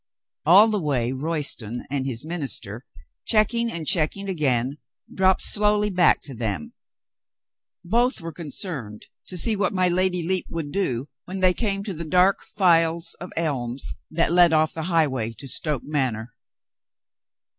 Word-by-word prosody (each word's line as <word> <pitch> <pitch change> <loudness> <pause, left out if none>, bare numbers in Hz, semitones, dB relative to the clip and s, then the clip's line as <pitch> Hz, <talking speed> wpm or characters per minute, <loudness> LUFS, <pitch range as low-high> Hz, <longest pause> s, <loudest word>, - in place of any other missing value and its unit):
All 195 +6 +8
the 210 -1 0
way 130 -6 0
Royston 135 -5 -3
and 135 -2 -2
his 125 +1 -3
minister, 135 - -1 0.4
checking 230 +2 +1
and 165 -2 -5
checking 175 +5 0
again, 140 -6 0 0.3
dropped 190 0 +2
slowly 210 0 +3
back 180 -2 +3
to 140 - -7
them. 105 -9 -4 1.1
Both 240 +7 +1
were 165 -1 -7
concerned 145 - -5 0.2
to 180 - -4
see 220 +6 +2
what 200 -2 0
my 185 -1 +2
Lady 180 -1 0
Lepe 185 0 0
would 160 -3 -5
do 135 -9 -1 0.2
when 190 +1 -5
they 185 -1 +4
came 200 -1 -2
to 200 -2 -5
the 170 0 -5
dark 180 +4 +3
files 170 -3 +2
of 180 - -8
elms 135 -6 -2 0.2
that 165 +1 +1
led 175 -2 +6
off 155 0 +2
the 160 -1 -4
highway 130 -9 +1
to 135 +5 -10
Stoke 145 +1 0
Manor. 125 -6 -2
165 Hz, 150 wpm, -23 LUFS, 135-185 Hz, 1.1 s, All